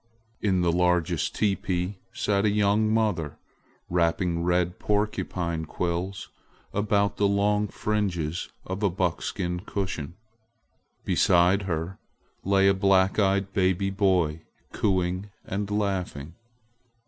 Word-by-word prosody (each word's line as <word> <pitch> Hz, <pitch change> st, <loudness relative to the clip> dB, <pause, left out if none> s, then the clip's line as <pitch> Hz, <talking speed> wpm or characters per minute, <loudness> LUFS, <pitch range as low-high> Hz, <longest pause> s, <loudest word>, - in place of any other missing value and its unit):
In 95 Hz, -4 st, +2 dB
the 85 Hz, -1 st, +2 dB
largest 90 Hz, -2 st, +1 dB
teepee 95 Hz, -2 st, -1 dB
sat 100 Hz, -1 st, 0 dB
a 105 Hz, -, +3 dB
young 105 Hz, +1 st, +2 dB
mother 100 Hz, -10 st, 0 dB, 0.5 s
wrapping 85 Hz, 0 st, +1 dB
red 90 Hz, 0 st, 0 dB
porcupine 95 Hz, -5 st, -1 dB
quills 90 Hz, +4 st, -3 dB, 0.4 s
about 100 Hz, -1 st, +1 dB
the 100 Hz, -, +3 dB
long 105 Hz, +1 st, +2 dB
fringes 90 Hz, -7 st, -2 dB, 0.2 s
of 95 Hz, +2 st, -4 dB
a 100 Hz, -, +3 dB
buckskin 90 Hz, 0 st, -2 dB
cushion. 90 Hz, -5 st, -4 dB, 0.9 s
Beside 90 Hz, +2 st, +4 dB
her 85 Hz, +3 st, -3 dB, 0.4 s
lay 95 Hz, 0 st, +3 dB
a 100 Hz, -, +5 dB
black 95 Hz, 0 st, +3 dB
eyed 100 Hz, -1 st, +1 dB
baby 95 Hz, 0 st, +1 dB
boy 90 Hz, -6 st, +1 dB, 0.3 s
cooing 95 Hz, 0 st, 0 dB, 0.2 s
and 100 Hz, +1 st, -3 dB
laughing. 95 Hz, -7 st, -2 dB
95 Hz, 110 wpm, -26 LUFS, 90-100 Hz, 0.9 s, a